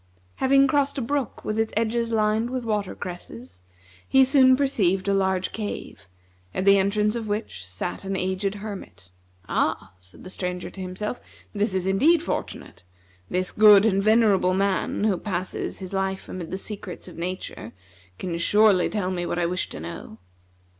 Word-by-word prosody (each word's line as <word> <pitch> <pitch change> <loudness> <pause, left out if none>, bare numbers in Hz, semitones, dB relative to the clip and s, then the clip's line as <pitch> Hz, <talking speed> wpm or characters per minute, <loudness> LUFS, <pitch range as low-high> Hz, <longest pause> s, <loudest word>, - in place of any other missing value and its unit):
Having 275 +1 +4
crossed 280 +1 +1
a - - 0
brook 265 0 -3
with 215 +1 -1
its 225 0 0
edges 230 +1 0
lined 220 +1 +1
with 255 -1 -4
water 210 -3 -2
cresses, 125 - -8 0.5
he 265 0 +6
soon 260 -1 +6
perceived 200 -9 +1
a 200 - +2
large 190 -1 0
cave, 210 - -6 0.5
at 190 - -1
the 200 0 +6
entrance 210 +3 +1
of 230 -2 -4
which 205 - -4
sat 95 - -5
an 195 0 -3
aged 190 +2 -1
hermit. 200 - -9 0.4
"Ah," - - -1
said 90 +1 -17
the 185 - -9
Stranger 180 -1 -4
to 190 - -9
himself, 185 +5 -5 0.3
"this 205 -2 0
is 185 -1 0
indeed 295 - +3
fortunate! - - -5 0.5
This 185 0 0
good 210 -1 +7
and 195 -3 +2
venerable 210 -4 +3
man, 195 +1 0
who 210 -4 +2
passes 185 -3 -3
his 190 0 -8
life 190 0 -2
amid 175 -3 -6
the 190 - -3
secrets 200 -2 -6
of - - -11
nature, 175 - -5 0.5
can 175 -2 -4
surely 205 0 +4
tell 200 -3 -2
me 175 -1 -2
what 175 - -2
I 175 - +1
wish 180 +2 -2
to - - -8
know." 85 +6 -8
195 Hz, 170 wpm, -24 LUFS, 185-220 Hz, 0.5 s, good